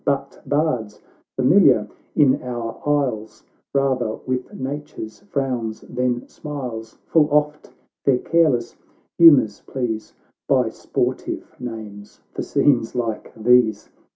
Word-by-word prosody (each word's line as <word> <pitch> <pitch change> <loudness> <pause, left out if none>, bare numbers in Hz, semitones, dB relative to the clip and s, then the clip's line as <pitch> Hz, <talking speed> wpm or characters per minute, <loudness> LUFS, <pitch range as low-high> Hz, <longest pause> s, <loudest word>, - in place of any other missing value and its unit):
But - - -2
bards, 135 -8 0 0.4
familiar 130 - +5 0.3
in 135 -3 +4
our 120 -2 -5
isles 110 -7 -1 0.3
Eather 130 -5 +1
with 130 0 -3
Nature's 135 -5 -6
frowns 130 - -3
than 125 -1 -2
smiles, 125 -7 -7
Full 155 -2 +4
oft 150 0 0 0.3
their 135 -3 +4
careless 135 -6 +1 0.4
humours 145 -11 +7
please 110 -5 -3 0.3
By - - +3
sportive - - -3
names 110 -4 -8
for - - -3
scenes 125 -5 +1
like 115 -3 -3
these. 110 -2 +3
125 Hz, 105 wpm, -22 LUFS, 110-145 Hz, 0.4 s, humours